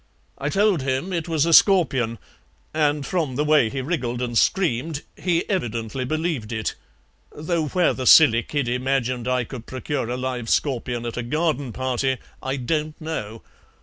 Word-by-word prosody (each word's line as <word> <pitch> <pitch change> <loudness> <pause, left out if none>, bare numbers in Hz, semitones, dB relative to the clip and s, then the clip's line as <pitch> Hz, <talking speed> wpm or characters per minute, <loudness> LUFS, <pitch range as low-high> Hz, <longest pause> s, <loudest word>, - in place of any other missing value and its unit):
I 140 - -1
told 195 -1 +2
him 135 +8 -2
it 170 -2 -2
was 160 -2 +2
a 165 - +2
scorpion, 135 - +4 0.6
and 150 -2 +1
from 160 -8 -1
the 150 +3 0
way 150 -7 +4
he 135 +3 -3
wriggled 130 -5 -2
and 120 -1 -3
screamed 155 - +1
he 170 -2 0
evidently 120 - -2
believed 155 -6 -2
it, 110 -1 -2 0.6
though 160 +1 -2
where 180 +3 +2
the 130 -2 -3
silly 115 -8 +7
kid 140 +1 -2
imagined 125 -1 -1
I 125 -1 +1
could 120 -1 -9
procure 130 -1 -3
a 125 - -2
live 125 -2 -3
scorpion 120 -4 0
at 120 - -5
a - - -1
garden 145 0 -1
party 130 +1 -1 0.2
I 135 +1 -2
don't 150 +4 -2
know. 115 -9 -5
135 Hz, 165 wpm, -23 LUFS, 120-155 Hz, 0.6 s, silly